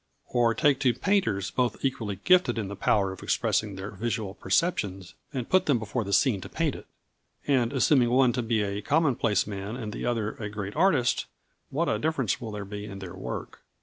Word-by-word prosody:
Or 120 -2 +2
take 140 -3 +3
two 125 -4 +2
painters 115 - +1
both 125 +1 -1
equally 115 -6 -1
gifted 180 -7 +4
in 105 -4 -2
the 100 - -5
power 100 -1 +2
of 95 - -9
expressing 105 -3 0
their 95 +2 -6
visual 105 -1 -3
perceptions, 95 - -1 0.2
and 130 -5 -4
put 185 0 +3
them 140 -4 +4
before 115 +1 -2
the 100 - -5
scene 105 -1 +3
to - - -8
paint - - 0
it. - - -10 0.6
And 125 -5 +2
assuming 130 -2 +3
one 125 0 +4
to 125 - 0
be 115 -2 +1
a 100 0 -3
commonplace 125 - +2
man 100 +1 -5
and 110 -4 -5
the - - -4
other 115 -3 0
a 105 -2 -5
great 100 -1 -5
artist, 155 -8 +2 0.4
what 165 +5 0
a - - 0
difference 145 - 0
will 115 - -5
there 105 -1 -5
be 105 +1 -6
in 100 -2 -8
their 95 -2 -8
work. 95 - -6
115 Hz, 205 wpm, -27 LUFS, 100-130 Hz, 0.6 s, gifted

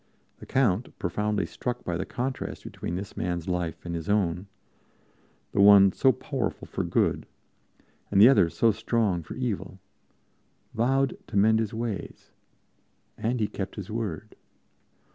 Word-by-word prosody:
The - - -11
Count, 120 -4 +1
profoundly 105 +3 -1
struck 125 0 -4
by 90 - -2
the 90 - -3
contrast 130 +2 -4
between 85 - -5
this 95 +2 -6
man's 85 -2 -3
life 90 -2 -3
and 85 - -4
his 85 +2 -5
own 95 -2 +1 1.0
the 100 - +2
one 100 -1 +8
so 130 +7 +4
powerful 110 - -4
for - - -3
good, - - 0 0.8
and 100 - +2
the 105 - +10
other 125 -10 +5
so 115 +6 +3
strong 105 -5 0
for 80 - -9
evil 115 -6 -4 0.9
vowed 135 +3 +1
to - - -3
mend 110 +2 +5
his 110 -2 -1
ways. 110 -4 -5 0.8
And 120 +2 -1
he 105 - +1
kept 100 -1 -6
his 100 -1 -7
word. 105 -8 -4
105 Hz, 145 wpm, -27 LUFS, 90-115 Hz, 1.0 s, the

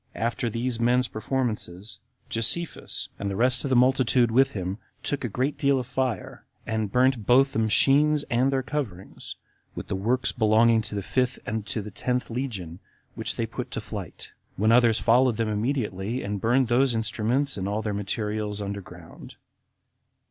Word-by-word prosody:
22. 115 - -2
After 120 +1 -1
these 115 +1 -2
men's 125 +2 +2
performances, 110 -5 -3 0.3
Josephus, 115 +10 -1
and 100 - -2
the 100 - -3
rest 125 +4 +2
of 140 - -2
the 130 - +2
multitude 125 -1 +3
with 135 +3 +3
him, 95 +1 -4 0.2
took 145 -1 -1
a 120 - -2
great 130 +8 -2
deal 140 -1 +3
of 125 - -4
fire, 125 -4 -3 0.2
and 110 -3 -2
burnt 125 -3 +2
both 135 +2 +5
the - - 0
machines 140 +7 +3
and 125 +3 +1
their 135 -1 0
coverings, 125 -10 -5 0.4
with - - -7
the - - -1
works 120 +7 0
belonging 110 0 +4
to 105 - -6
the 100 - -3
fifth 130 +5 0
and 110 -1 -3
to 110 - -3
the 105 - -8
tenth 125 +4 -2
legion, 100 -9 -4 0.3
which - - -4
they - - -1
put - - -6
to - - -4
flight; - - -8 0.3
when 110 +3 +3
others 115 -2 +5
followed 120 0 +3
them 115 -1 0
immediately, 110 -1 -2
and 100 -1 -3
buried 125 +3 +3
those 120 +1 +2
instruments 115 +5 0
and 95 0 -3
all 105 +2 -2
their 105 -1 -2
materials 105 +1 -3
under 100 0 -4
ground. 85 -1 -13
115 Hz, 175 wpm, -26 LUFS, 105-130 Hz, 0.4 s, both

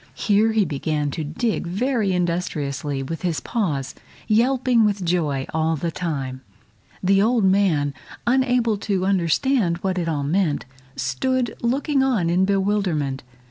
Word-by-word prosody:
Here 215 +2 +2
he 215 -3 +3
began 150 -1 -2
to 160 - -4
dig 175 +7 -2
very 220 +2 0
industriously 150 -6 -2
with 165 +5 -5
his 175 -4 -1
paws, 150 - -2 0.3
yelping 240 +1 +3
with 205 -3 0
joy 155 -6 0
all 160 0 +1
the 165 +3 -3
time. 135 -7 -4 0.6
The 195 +1 +4
old 230 +1 +2
man, 185 -7 +2 0.3
unable 245 -3 +2
to 195 -3 -1
understand 190 - +1
what 190 -1 0
it 165 -1 -1
all 145 -3 -1
meant, 155 0 0 0.3
stood 235 - -1
looking 270 +4 +1
on 225 -11 +1
in 185 +2 +3
bewilderment. 190 -9 0
185 Hz, 140 wpm, -22 LUFS, 155-220 Hz, 0.6 s, The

